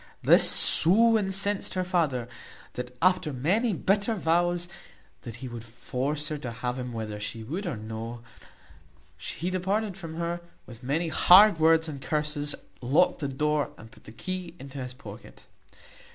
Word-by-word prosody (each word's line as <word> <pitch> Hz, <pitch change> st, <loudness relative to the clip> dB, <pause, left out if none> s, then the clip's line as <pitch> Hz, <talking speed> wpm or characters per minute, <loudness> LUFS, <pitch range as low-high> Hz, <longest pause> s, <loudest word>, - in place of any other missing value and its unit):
This -, -, +6 dB
so 225 Hz, +7 st, +8 dB
incensed 195 Hz, -1 st, -1 dB
her 185 Hz, -, -1 dB
father, 155 Hz, -10 st, -2 dB, 0.5 s
that 125 Hz, 0 st, -8 dB
after 185 Hz, -4 st, +1 dB
many 185 Hz, -, -1 dB
bitter 200 Hz, +5 st, -1 dB
vows, 175 Hz, 0 st, 0 dB, 0.5 s
that 115 Hz, -2 st, -9 dB
he 130 Hz, +2 st, -9 dB
would 120 Hz, -2 st, -9 dB
force 135 Hz, +6 st, -5 dB
her 150 Hz, -1 st, -5 dB
to 125 Hz, -4 st, -7 dB
have 125 Hz, +2 st, -5 dB
him 125 Hz, -1 st, -6 dB
whether 110 Hz, -2 st, -6 dB
she 105 Hz, +2 st, -7 dB
would 175 Hz, -, -6 dB
or 150 Hz, -9 st, -4 dB
no, 110 Hz, +2 st, -8 dB, 1.0 s
he 180 Hz, +3 st, -5 dB
departed 195 Hz, +2 st, -2 dB
from 165 Hz, -4 st, -9 dB
her 170 Hz, +1 st, -4 dB, 0.2 s
with 120 Hz, -1 st, -14 dB
many 155 Hz, +6 st, -2 dB
hard 190 Hz, +3 st, +6 dB
words 160 Hz, +1 st, +3 dB
and 140 Hz, -3 st, -8 dB
curses, 150 Hz, 0 st, -1 dB, 0.3 s
locked 150 Hz, +9 st, +1 dB
the 145 Hz, -, -3 dB
door, 150 Hz, +2 st, -1 dB
and 110 Hz, +1 st, -15 dB
put -, -, -21 dB
the -, -, -12 dB
key 180 Hz, +6 st, -7 dB
into 140 Hz, 0 st, -10 dB
his 125 Hz, -1 st, -7 dB
pocket. 140 Hz, -, -13 dB
150 Hz, 160 wpm, -26 LUFS, 125-180 Hz, 1.0 s, so